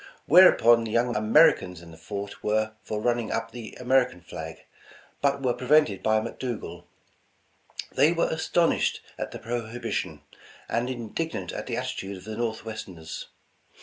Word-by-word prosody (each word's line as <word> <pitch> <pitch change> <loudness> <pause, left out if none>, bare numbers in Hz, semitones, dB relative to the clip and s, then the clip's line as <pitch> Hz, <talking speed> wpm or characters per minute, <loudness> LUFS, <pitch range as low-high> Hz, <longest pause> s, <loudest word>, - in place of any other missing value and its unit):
Whereupon 120 -9 +7
the 115 - -4
young 120 +1 +2
Ameri 110 +1 +6
cans 90 -2 -8
in 85 -1 -13
the - - -12
fort 100 +4 -7
were 110 +1 +1
for 105 0 -4
running 120 0 0
up 115 0 -2
the 120 -2 -9
American 125 -6 +2
flag, 80 -1 -8 0.6
but 140 -1 +1
were 125 -2 +2
prevented 125 -7 +3
by 110 0 +3
McDougal. 115 +1 -5 1.1
They 145 +5 +4
were 170 -1 +1
as 160 - -3
tonished 170 -1 +2 0.2
at - - -3
the - - -7
prohibition, 115 -1 -4 0.4
and 120 +2 -1
indignant 120 - -4
at - - -6
the - - -2
atti - - -3
tude 95 0 -6
of 90 - -13
the 110 +2 -6
Northwesters. 110 -8 -5
115 Hz, 155 wpm, -26 LUFS, 105-125 Hz, 1.1 s, Whereupon